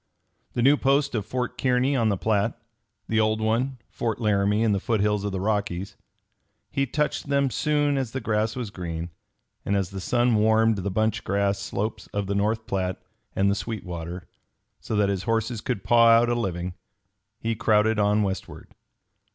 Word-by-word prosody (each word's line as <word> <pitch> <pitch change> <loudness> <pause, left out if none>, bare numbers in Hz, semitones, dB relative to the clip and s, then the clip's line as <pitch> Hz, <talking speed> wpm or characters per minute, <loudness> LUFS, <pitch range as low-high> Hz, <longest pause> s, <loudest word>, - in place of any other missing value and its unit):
The 120 - 0
new 140 +3 +6
post 140 +1 +2
of 105 -3 -2
Fort 125 +1 -3
Kearny 130 +2 +2
on 115 -4 +2
the 100 - 0
Platte; 110 +2 0 0.5
the 110 - +1
old 110 0 +2
one, 120 +5 0
Fort 115 -1 -2
Laramie 105 -1 +2
in 110 - +3
the 100 - +1
foothills 105 -1 0
of 100 - -2
the 95 - -3
Rockies 100 -2 -2 0.8
he 140 0 0
touched 150 +3 -1
them 140 -1 +2
soon 145 +4 +1
as 130 -3 -2
the 130 - -4
grass 110 -1 0
was 120 -5 -4
green; 85 -2 -5 0.5
and 100 - 0
as 100 -1 -1
the 95 -1 -6
sun 120 +3 +2
warmed 110 0 +3
the 100 +2 -2
bunch 110 +3 0
grass 100 0 0
slopes 105 +3 -4
of 100 -1 -1
the 100 - -2
North 110 +3 0
Platte 95 -2 -2 0.4
and 100 +1 +3
the - - +2
Sweetwater, 90 -5 -5 0.5
so 110 - -4
that 105 -1 +2
his 95 -2 -1
horses 115 0 -1
could 125 - -3
paw 115 -1 +5
out 115 +1 +6
a - - +2
living, 90 -6 -2 0.7
he 115 0 -1
crowded 110 0 +2
on 105 +1 +3
westward. 95 -1 -5
110 Hz, 180 wpm, -25 LUFS, 100-120 Hz, 0.8 s, new